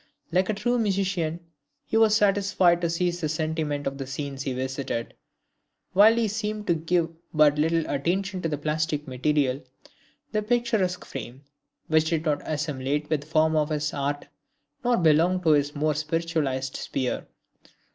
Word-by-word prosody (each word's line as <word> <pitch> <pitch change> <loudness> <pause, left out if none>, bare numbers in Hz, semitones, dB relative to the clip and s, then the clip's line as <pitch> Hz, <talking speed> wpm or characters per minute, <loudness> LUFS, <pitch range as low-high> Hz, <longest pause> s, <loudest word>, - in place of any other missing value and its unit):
Like 185 +3 +2
a 215 - +1
true 240 +4 0
musician, 190 -6 0 0.4
he - - -4
was 220 -1 +5
satisfied 195 -4 +3
to 170 - +1
seize 175 +1 -1
the 155 - -1
sentiment 155 -2 -2
of 135 0 -3
the 135 - -4
scenes 135 0 -5
he 135 - -2
visited, 130 -2 -3 0.8
while 210 +4 +7
he 230 -1 +1
seemed 210 0 -3
to 175 - +3
give 165 +1 0 0.2
but 150 -1 +5
little 165 +1 +1
attention 185 +6 -1
to 165 - -1
the 150 - -2
plastic 150 0 -1
material, 135 +1 0 0.7
the 215 - 0
picturesque 220 -5 0
frame, 130 +4 -8 0.4
which 155 0 +3
did 165 -1 -1
not 150 -2 +1
assimilate 150 -1 -2
with 155 -3 +1
the 145 - -14
form 160 0 +2
of 150 0 +2
his 150 -1 -1
art, 145 0 -2 0.6
nor 240 -1 +3
belong 170 +2 +4
to 165 - +3
his 145 -1 +3
more 155 +1 +1
spiritualized 155 -4 -1
sphere. 130 -2 -3
160 Hz, 160 wpm, -26 LUFS, 145-185 Hz, 0.8 s, while